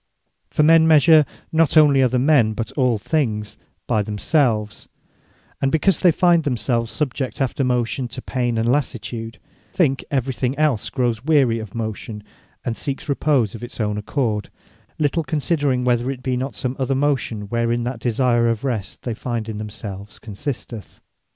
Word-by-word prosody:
For 150 - +1
men 160 +1 +6
measure, 155 -1 +6 0.2
not 160 -1 +3
onely 145 -3 +6
other 125 -1 +2
men, 125 -5 +3
but 115 +3 -4
all 130 -4 +1
other 105 - -8
things, 110 -9 -1 0.3
by 110 - +1
themselves: 105 +1 0 0.7
and 135 - +1
because 170 +5 +2
they 180 - +5
find 170 0 +3
themselves 120 -3 -1
subject 135 -3 -3
after 135 0 0
motion 125 0 0
to 130 - -7
pain, 120 -3 -1
and 115 +1 0
lassitude, 120 -4 -3 0.4
think 155 -8 +1
every 135 -3 -1
thing 130 +2 -2
els 150 -8 +1
growes 120 -3 -1
weary 135 -7 +3
of 110 -2 -9
motion, 110 -1 -5 0.4
and 115 - -1
seeks 140 +3 -5
repose 140 -7 +1
of 115 - -9
its 120 - -9
own 105 -2 0
accord; 105 -1 -2 0.5
little 155 +2 0
considering, 145 -3 0
whether 125 0 +1
it 130 -2 -5
be 130 -2 0
not 130 -2 -3
some 125 +6 -2
other 135 0 0
motion, 135 -6 0
wherein 115 +3 -1
that 120 0 -4
desire 120 0 +2
of 115 0 -2
rest 110 -8 -4
they 120 - -2
find 115 -1 -4
in 110 -2 -5
themselves, 105 -1 -8
consisteth. 115 0 -7
125 Hz, 165 wpm, -21 LUFS, 115-140 Hz, 0.7 s, men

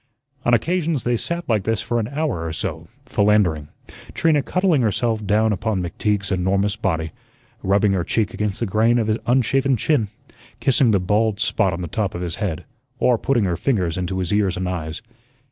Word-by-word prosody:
On 120 - +3
occasions 165 - 0
they 120 0 +1
sat 170 +8 -4
like 110 -4 +2
this 115 0 0
for 120 +4 -1
an 110 - -2
hour 140 - -2
or 80 - -3
so, - - -4 0.2
"philandering," 100 -8 +2 0.5
Trina 155 -3 +3
cuddling 180 -2 +1
herself 110 0 0
down 105 +2 +2
upon 105 0 -1
McTeague's 100 +3 -1
enormous 95 +2 +1
body, 80 -7 -2 0.5
rubbing 100 +1 +2
her 95 -3 +1
cheek 105 +2 0
against 105 -2 -2
the 115 - 0
grain 110 +4 +2
of 115 - +1
his 110 0 +1
unshaven 130 +2 +2
chin, 120 -2 +1 0.5
kissing 135 -2 +3
the 100 -3 +3
bald 105 +3 +1
spot 95 -3 +1
on 85 0 -4
the - - -3
top 100 +1 -2
of 85 - -4
his 85 -1 -4
head, 90 -7 -2 0.3
or 125 -3 +2
putting 125 -4 +1
her 90 -3 0
fingers 90 -8 0
into 95 0 -3
his 90 0 -1
ears 100 -3 +1
and 90 0 -2
eyes. 85 -2 -4
105 Hz, 190 wpm, -21 LUFS, 95-120 Hz, 0.5 s, On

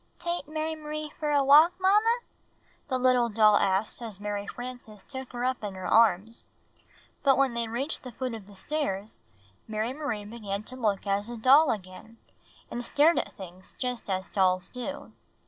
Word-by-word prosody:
"Tate 345 -3 -3
Mary 310 +1 -2
M'rie 305 0 -5
for 300 - -1
a 285 -1 +3
walk, 300 +6 +7
IMamma?" 425 +5 +3 0.7
the 260 -3 0
little 250 -2 +3
doll 215 -1 +5
asked 195 +5 0
as 220 -5 -5
Mary 205 -1 -4
Frances 245 -5 -8
took 265 +2 -8
her 245 0 -3
up 255 -3 -1
in 200 -2 -4
her 185 - -7
arms; 225 0 +3 0.7
but 270 -2 +4
when 270 -3 +2
they 235 -1 -2
reached 255 +7 -3
the 250 - -9
foot 255 +1 -4
of 215 -4 -8
the 205 - -14
stairs, 210 -4 -3 0.5
Mary 220 +3 -2
Marie 270 -8 -4
began 210 -2 -5
to 255 - -10
look 215 -6 -1
like 200 0 +1
a 240 - -5
doll 275 +6 +6
again, 205 +2 -6 0.5
and 240 - -4
stared 300 +7 +4
at - - -5
things 185 -1 -11
just 250 -4 -4
as 190 0 -2
doUs 185 -1 +2
do. 280 +3 -6
235 Hz, 180 wpm, -28 LUFS, 205-280 Hz, 0.7 s, walk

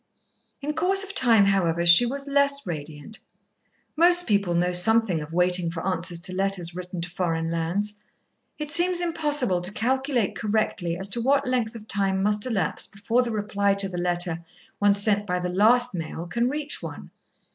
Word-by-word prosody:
In 300 +2 -3
course 375 +5 +2
of 395 0 -6
time, 230 - +4
however, 170 -4 0
she 170 +8 +7
was 275 +3 -2
less 280 0 +3
radiant. 150 +3 -8 0.8
Most 350 +2 +4
people 200 -5 0
know 180 +1 0
something 190 -1 +4
of 150 +1 -9
waiting 180 0 +1
for 165 0 -6
answers 180 -1 -3
to 185 - -4
letters 185 -3 -2
written 180 -1 -7
to 175 - -5
foreign 165 -2 -3
lands. 195 +6 -3 0.6
It 300 -1 -4
seems 345 +2 +5
impossible 295 - +1
to 180 +2 -2
calculate 255 0 -1
correctly 205 -5 -2
as 190 +2 -3
to 235 +4 -1
what 275 +3 +1
length 245 -3 -2
of 220 -1 -11
time 195 -2 -1
must 210 +3 +1
elapse 195 -10 -2
before 225 +4 -1
the 245 - -3
reply 205 -2 -1
to 200 0 0
the 180 -2 -6
letter 175 -1 -2 0.4
one 205 -1 +3
sent 205 0 0
by 180 -1 -1
the 180 0 -4
last 235 +6 +2
mail 165 -1 -6
can 235 +7 -1
reach 295 +1 -3
one. - - -9
200 Hz, 180 wpm, -24 LUFS, 175-250 Hz, 0.8 s, she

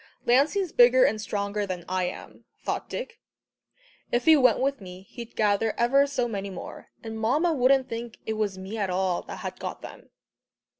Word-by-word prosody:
"Lancey's 300 +9 +2
bigger 245 +1 +6
and 215 -2 +2
stronger 205 0 -2
than 180 -2 -5
I 185 0 0
am," 180 - -8
thought - - -4
Dick. 475 -2 -6 0.9
"If 240 0 0
he 320 - +8
went 255 -6 +4
with 275 -2 -1
me, 185 0 -10
he'd 235 +4 -11
gather 210 +1 +1
ever 275 +4 +4
so 255 -4 -1
many 200 -3 -4
more, 185 - -9
and 220 -1 -6
Mamma 295 +10 +2
wouldn't 265 -1 +3
think 230 0 -6
it 220 - -2
was 210 -3 -2
me 195 +4 -6
at 200 -2 -1
all 185 -1 0
that - - -9
had - - -5
got - - -6
them." - - -11
225 Hz, 185 wpm, -26 LUFS, 200-260 Hz, 0.9 s, he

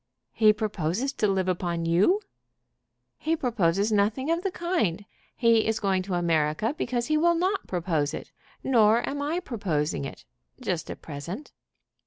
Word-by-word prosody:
"He 215 -1 +5
proposes 210 - -2
to 215 - +1
live 190 -2 0
upon 175 -2 -1
you?" 195 - +3 1.0
"He 320 +1 +1
proposes 205 - +1
nothing 215 +8 +1
of 335 +1 +1
the 390 - -1
kind. 335 - -1 0.3
He 230 -3 +3
is 220 -1 0
going 195 -2 +1
to 185 -1 -3
America 165 - +1
because 240 -5 -1
he 310 +3 +1
will 340 +2 +4
not 375 +4 0
propose 165 -5 0
it. - - -7 0.3
Nor 230 -3 +4
am 285 0 -3
I 310 +5 -1
proposing 170 - -2
it, - - -9 0.3
just - - -3
at - - -8
present." 170 - -7
210 Hz, 155 wpm, -26 LUFS, 175-275 Hz, 1.0 s, He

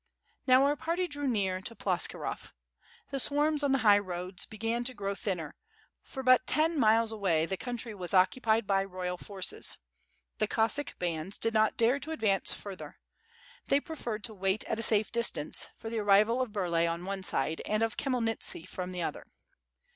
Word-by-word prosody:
Now 255 +1 +6
our 285 +1 +3
party 335 +4 -1
drew 290 -3 -3
near 190 -6 0
to 230 +4 -5
Ploskirov. - - -1 0.6
The 275 - -1
swarms 295 +3 +2
on 280 - +2
the 270 - +4
high 205 -1 +7
roads 180 -1 -5
began 225 +2 -2
to 255 0 -1
grow 200 -1 -2
thinner, 185 -7 -4 0.5
for 265 - -6
but 255 0 +5
ten 315 0 +2
miles 225 0 +4
away 185 -7 +1
the 190 - -3
country 240 +1 -5
was 180 -4 -4
occupied 220 +4 +3
by 195 -1 +2
the 195 - -4
royal 180 -1 -4
forces. 190 0 -3 0.6
The 215 - +2
Cossack 230 +7 0
bands 170 +1 -3
did 225 - 0
not 220 -1 +2
dare 240 +4 +3
to 315 +3 -6
ad 320 - -5
vance 195 -3 +2
further. 195 -3 -6 0.7
They 275 - +3
preferred 245 - -5
to 230 - -1
wait 195 +1 -1
at 225 - -3
a - - -1
safe 215 -1 +4
distance, 235 -10 +1
for 225 - -7
the 230 - -1
arrival 210 +4 +4
of 250 -4 -2
Burlay 170 -4 +1
on 170 +1 -3
one 195 0 -3
side, 160 -3 0
and 215 +1 +1
of 225 +1 -1
Khmyelnitski 230 - -1
from 185 0 -6
the 180 -1 -3
other. - - -5
215 Hz, 185 wpm, -30 LUFS, 190-250 Hz, 0.7 s, high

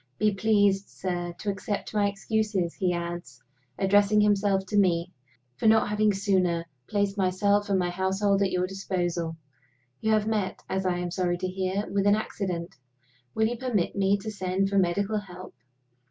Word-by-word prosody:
Be 210 -1 +2
pleased, 200 -1 +2
sir, 175 -2 -3
to 205 - -2
accept 195 +2 -4
my 205 -1 +2
excuses," 200 -3 -1
he 185 -2 0
adds, 170 -7 -5 0.3
addressing 205 +2 +4
himself 200 -2 +2
to 210 - -4
me, 180 -3 +2 0.5
"for - - +1
not 220 -1 +5
having 210 0 +2
sooner 185 -4 +1 0.2
placed 200 -1 -1
myself 200 +2 +2
and 195 - +3
my 175 -1 0
household 195 +2 +1
at 195 - +3
your 180 0 +1
disposal. 175 -4 -3 0.6
You 220 0 +1
have 215 -1 +2
met, 215 -3 -2
as 190 0 -1
I 180 -1 0
am 175 0 -3
sorry 175 -1 0
to 185 +1 -3
hear, 190 +2 -2
with 200 0 0
an 205 - +6
accident. 180 -5 -4 0.6
Will 220 - +3
you 235 +2 -1
permit 230 -8 -1
me 200 0 +2
to 215 +2 -6
send 190 -1 -1
for 200 0 +2
medical 200 +4 +1
help? 185 -2 -11
195 Hz, 170 wpm, -27 LUFS, 180-205 Hz, 0.6 s, an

